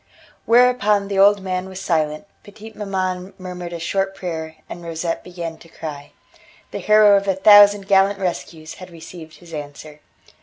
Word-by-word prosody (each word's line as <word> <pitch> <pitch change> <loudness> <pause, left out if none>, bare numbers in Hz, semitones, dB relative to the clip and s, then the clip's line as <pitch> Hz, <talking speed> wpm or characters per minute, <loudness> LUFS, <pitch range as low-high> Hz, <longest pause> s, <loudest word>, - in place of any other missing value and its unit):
Whereupon 230 -4 +3
the 195 -1 -1
old 200 0 +5
man 185 0 -4
was 190 0 -8
silent, 155 -2 -1 0.2
petite 215 +1 -13
maman 190 -2 -4
murmured 180 -2 -8
a 170 - -5
short 195 +3 -2
prayer, 160 -4 -6
and 175 - -9
Rosette 165 0 -4
began 170 -2 -7
to 165 - -17
cry. 145 -3 -8 0.6
The - - -5
hero 210 -1 +5
of 200 0 -3
a 195 - +1
thousand 205 0 +6
gallant 195 0 +3
rescues 170 -4 -5
had 185 - -10
received 165 -1 -12
his 170 -2 -16
answer. 150 0 -9
185 Hz, 160 wpm, -20 LUFS, 165-200 Hz, 0.6 s, thousand